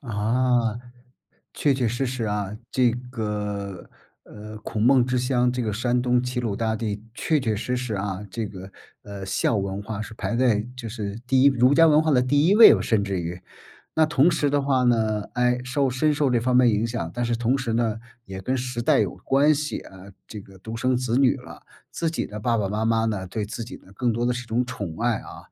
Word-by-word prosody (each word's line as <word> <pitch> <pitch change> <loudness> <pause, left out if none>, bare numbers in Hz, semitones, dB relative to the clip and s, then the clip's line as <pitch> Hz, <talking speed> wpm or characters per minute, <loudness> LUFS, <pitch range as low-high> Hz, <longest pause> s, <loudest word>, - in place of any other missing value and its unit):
啊， 115 0 0 0.7
确 145 -2 +1
确 130 -2 0
实 120 +4 -2
实 125 -2 -3
啊， 105 -1 -3
这 125 -2 +3 0.2
个， 105 -5 -4 0.4
呃， 105 +1 -10
孔 105 0 -4
孟 125 0 +5
之 125 0 0
乡， 125 -1 +1
这 125 0 -2
个 110 - -2
山 120 +3 0
东 125 0 +2
齐 125 0 -3
鲁 110 -4 -2
大 110 +1 -1
地， 105 -2 -4
确 155 +3 0
确 110 -4 -1
实 125 +4 -2
实 125 -3 -3
啊， 100 0 -3
这 110 +1 -3
个， 95 -1 -10 0.3
呃， 100 -2 -8
孝 100 +3 0
文 100 0 -3
化 105 0 -5
是 110 +1 -7
排 115 - -3
在 120 -4 +2
就 115 -2 -6
是 105 -1 -5
第 130 0 +3
1 - - +6
儒 130 +1 +3
家 165 +1 +6
文 155 0 +5
化 160 - +1
的 125 - +4
第 145 +4 +2
1 200 - +4
位， 225 +1 +8
甚 110 -3 +1
至 100 -2 -2
于， 85 +2 -5 0.5
那 160 -1 +4
同 150 +3 +3
时 150 -3 +1
的 145 0 +2
话 130 -2 +1
呢， 110 -3 +1
唉， 125 0 +2
受 130 +1 0
深 150 +4 +1
受 145 -3 +1
这 120 -2 +2
方 125 +1 0
面 125 -1 +6
影 110 +1 +1
响， 115 -8 -4
但 120 - -2
是 120 0 0
同 120 +3 +1
时 125 -3 -2
呢， 115 -1 0 0.3
也 95 0 -7
跟 130 +7 -1
时 125 -1 -3
代 - - +3
有 100 -3 -1
关 140 +9 +3
系 150 +1 -3
啊， 95 0 -13 0.2
这 105 - -7
个 95 -1 -16
独 110 +4 -7
生 130 +1 +1
子 125 -1 -1
女 135 -2 +4
了， - - -12 0.3
自 165 - -2
己 165 - -3
的 105 - -8
爸 115 +2 0
爸 100 -3 -1
妈 105 +2 -2
妈 115 0 +2
呢， 95 -4 -2
对 105 +4 -3
自 115 +3 -6
己 125 - -9
呢， 95 - -19
更 120 +2 0
多 120 +2 -1
的 125 - +2
是 125 0 -5
种 115 +2 0
宠 100 -10 -6
爱 120 -1 +1
啊， - - -11
120 Hz, 240 characters per minute, -24 LUFS, 105-125 Hz, 0.7 s, 位